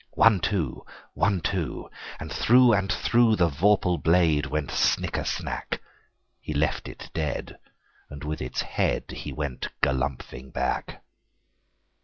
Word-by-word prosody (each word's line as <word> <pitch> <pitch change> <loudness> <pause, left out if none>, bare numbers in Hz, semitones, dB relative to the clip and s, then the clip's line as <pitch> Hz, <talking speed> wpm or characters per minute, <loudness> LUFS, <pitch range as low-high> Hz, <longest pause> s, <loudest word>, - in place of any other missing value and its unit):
One, 110 -4 +6
two! 85 - -1 0.3
One, 100 -3 +1
two! 90 -2 -3 0.3
And - - -6
through 125 0 +5
and 95 -1 +1
throughThe 105 -1 +3
vorpal 90 +2 +2
blade 80 -3 +3
went 75 -1 -2
snicker - - +1
snack! - - -3 0.6
He 75 - -6
left 75 +2 0
it - - -10
dead, 75 -2 -3 0.5
and 70 0 -9
with 75 +1 -4
its 65 - -2
headHe - - -2
went 70 -4 -3 0.2
galumphing 65 -1 -2
back. - - -2
80 Hz, 120 wpm, -26 LUFS, 70-100 Hz, 0.6 s, One